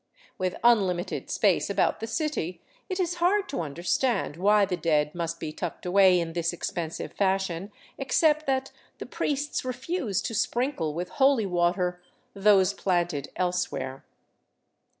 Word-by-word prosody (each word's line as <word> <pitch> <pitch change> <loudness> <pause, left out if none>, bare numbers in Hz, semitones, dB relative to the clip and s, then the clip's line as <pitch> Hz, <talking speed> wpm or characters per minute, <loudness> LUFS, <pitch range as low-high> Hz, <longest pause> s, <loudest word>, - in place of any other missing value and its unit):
With 185 -1 -1
unlimited 195 -6 +2
space - - +2
about - - +1
the 225 - -4
city, 260 - -2 0.3
it 370 0 -3
is 350 -1 -1
hard 390 +3 +3
to 275 - -2
understand 170 - -1
why 205 +3 +4
the 185 -2 -2
dead 150 -3 +1
must 170 -1 -3
be 155 - -5
tucked 175 +1 -5
away 185 0 +5
in 165 -1 -3
this 170 0 -1
expensive 170 -1 -4
fashion, 190 -1 -1 0.3
except 305 +3 +2
that 270 0 0 0.3
the - - -7
priests 290 +1 -2
refuse 255 - -2
to - - -3
sprinkle 235 - -1
with 175 +2 -3
holy 270 -5 +3
water 180 0 0 0.3
those 195 -1 +4
planted 175 -6 -1
else 180 0 0
where. 130 +1 -5
190 Hz, 145 wpm, -27 LUFS, 175-255 Hz, 0.3 s, away